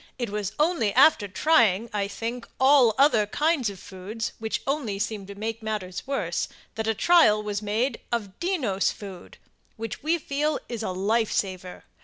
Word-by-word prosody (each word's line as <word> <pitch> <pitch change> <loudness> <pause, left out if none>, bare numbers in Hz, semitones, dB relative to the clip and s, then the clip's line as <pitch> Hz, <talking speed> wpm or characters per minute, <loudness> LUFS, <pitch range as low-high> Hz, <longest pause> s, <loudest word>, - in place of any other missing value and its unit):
It 240 -5 -3
was 210 -1 -3
only 305 - +2
after 260 -5 +6
trying, 230 - +3
I 200 -1 0
think, 230 +4 -5
all 265 -4 +5
other 265 -7 +4
kinds 295 0 +1
of 195 -2 -9
foods, 200 +5 -6
which 220 0 -3
only 270 -8 -1
seemed 205 -1 -3
to 200 - -9
make 225 +2 -4
matters 210 -2 -4
worse, 275 0 -1 0.3
that 220 0 -3
a 225 - +1
trial 215 - +5
was 205 -1 -3
made 220 +6 -1
of 210 -5 -3
DENNOS 295 - 0
FOOD, 195 -4 -10 0.4
which, 225 -1 -5
we 320 +4 +1
feel, 300 0 -1
is 235 -2 -5
a 220 - -2
life 215 +4 0
saver. 185 -2 -3
220 Hz, 170 wpm, -26 LUFS, 205-270 Hz, 0.4 s, after